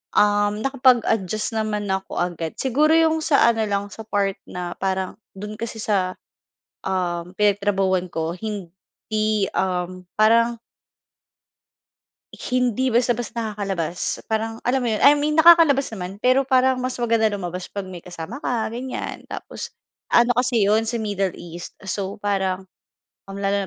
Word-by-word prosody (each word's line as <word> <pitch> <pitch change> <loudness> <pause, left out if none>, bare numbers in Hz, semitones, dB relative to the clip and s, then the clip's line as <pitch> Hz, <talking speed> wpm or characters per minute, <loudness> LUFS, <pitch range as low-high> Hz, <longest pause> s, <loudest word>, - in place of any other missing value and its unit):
um, 205 0 +3
nakapag 260 -3 +4
adjust 215 +2 -1
naman 215 -2 -1
ako 190 0 -3
agad, 170 -2 -2
siguro 295 +5 +2
yung 320 -1 +4
sa 310 -2 +3
ano 225 -1 -1
lang 200 0 -2
sa 220 -1 -10
part 200 -2 0
na 180 -1 -5
parang 190 -1 -2 0.2
dun 210 +2 -7
kasi 230 0 -4
sa, 185 -3 0 0.7
um, 180 -2 -2
pinagtrabahuhan 195 -2 +1
ko 165 0 -3
hindi, 210 +1 -3
um, 185 0 -2
parang 230 +2 +3 1.7
Hindi 250 0 0
basta-basta 240 0 0
nakakalabas, 195 -6 -3
parang 225 +1 -2
alam 250 0 0
mo - - +1
'yon, 215 - -1
I 290 +1 +7
mean 295 +1 0
nakakalabas 320 -3 +6
naman 190 +2 -7
pero 255 +3 +3
parang 260 0 +3
mas 255 0 -2
maganda 230 -2 +2
lumabas 180 -2 -5
'pag 200 -2 -5
may 180 -2 -9
kasama 175 +6 -7
ka 235 -3 0
ganyan, 250 +3 -5
tapos - - -7 0.4
ano 240 0 +5
kasi 250 -2 +2
yun 220 +2 +3
sa 230 +1 -2
Middle 200 -3 -1
East 175 0 -8 0.2
so 200 +2 -3
parang, 190 -2 -1 0.6
ah, - - -7
lalo 200 0 0
210 Hz, 140 wpm, -22 LUFS, 190-240 Hz, 1.7 s, I